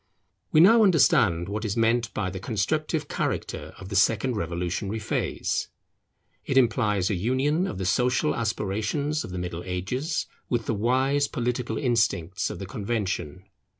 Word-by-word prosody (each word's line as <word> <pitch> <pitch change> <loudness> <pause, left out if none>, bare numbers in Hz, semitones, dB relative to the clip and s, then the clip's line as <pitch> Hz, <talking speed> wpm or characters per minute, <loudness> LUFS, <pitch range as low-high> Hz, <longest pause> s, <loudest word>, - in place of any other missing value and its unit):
We 155 - +6
now 225 +6 +7
understand 110 - +4
what 105 +2 -3
is 110 0 -2
meant 115 -1 +2
by 95 -3 -1
the 95 - -6
constructive 150 - -1
character - - -3
of 95 - -10
the 100 - -4
second 115 +5 +2
revolutionary 90 +3 -2
phase. 110 - -2 0.8
It 135 - -1
implies 105 -6 +2
a - - +1
union 130 - +1
of 100 - -5
the 95 - -3
social 125 +8 +2
aspirations 115 +8 -1
of - - -7
the 90 - -5
Middle 90 -1 -4
Ages 125 - -2 0.2
with 120 -2 0
the - - 0
wise 130 +6 +2
political 125 0 -2
instincts 105 - 0
of - - -6
the 100 - -6
Convention. 100 -5 -3
110 Hz, 150 wpm, -26 LUFS, 95-130 Hz, 0.8 s, now